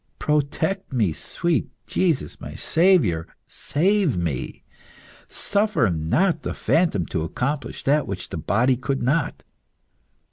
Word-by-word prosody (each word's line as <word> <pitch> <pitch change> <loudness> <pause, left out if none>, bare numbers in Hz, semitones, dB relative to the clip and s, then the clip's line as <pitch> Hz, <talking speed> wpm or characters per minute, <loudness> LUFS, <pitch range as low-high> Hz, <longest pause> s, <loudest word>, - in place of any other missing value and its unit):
Protect 150 +6 -1
me, 110 -10 +1
sweet 170 - -1 0.2
Jesus! 160 - -1
My - - -8
Saviour, 160 - +3 0.2
save 180 - +1
me! 80 -7 -3 0.6
Suffer 200 - +1
not 150 - +1
the - - -4
phantom 160 - +1
to 80 - -3
accomplish 125 - -3
that 145 +2 +2
which 100 -1 -5
the - - -5
body 125 +6 +2
could 135 +1 -2
not. 145 +4 0
140 Hz, 115 wpm, -23 LUFS, -, 0.6 s, Saviour